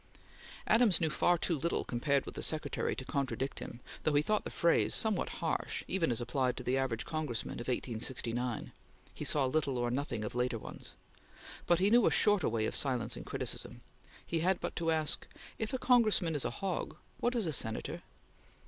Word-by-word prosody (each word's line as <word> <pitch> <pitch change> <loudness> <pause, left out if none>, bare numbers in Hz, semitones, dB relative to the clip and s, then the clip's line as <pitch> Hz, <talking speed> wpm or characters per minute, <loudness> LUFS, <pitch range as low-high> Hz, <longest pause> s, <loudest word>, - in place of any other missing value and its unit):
Adams 220 -5 +5
knew 160 -3 +1
far 175 +3 +3
too 170 +1 0
little, 170 +4 0
compared 140 +3 0
with - - -7
the - - -6
Secretary, 155 -1 0
to 130 - -6
contradict 135 -1 -2
him, 120 - -8 0.2
though 155 - +1
he 145 - +4
thought 215 +5 +1
the - - -5
phrase 170 0 +2
somewhat 220 -4 +2 0.2
harsh 160 - -2
even 180 -5 +1
as 120 - 0
applied 125 +1 -1
to 125 - -5
the 125 +2 0
average 130 -4 -1
Congressman 155 -10 -3
of 120 - -7
1869 120 -1 -2 0.4
he - - -6
saw 145 -3 +3
little 140 -1 0
or 120 0 0
nothing 125 -4 -2
of - - -5
later 125 -1 0
ones - - -9 0.7
but 175 - +4
he 195 +4 +2
knew 240 0 +6
a - - +6
shorter 205 -6 +3
way 110 -1 0
of - - 0
silencing 125 -4 +1
criticism. - - -3 0.4
He 165 - -1
had 180 +3 +1
but - - -4
to 165 -1 0
ask: 155 -2 0 0.3
"If 220 -1 -2
a 260 - -1
Congressman 220 -10 +3
is 145 - -1
a - - +1
hog, 195 -3 -4 0.2
what 245 +1 0
is 230 -4 +1
a 160 - 0
Senator?" 110 -4 0
145 Hz, 195 wpm, -32 LUFS, 125-175 Hz, 0.7 s, knew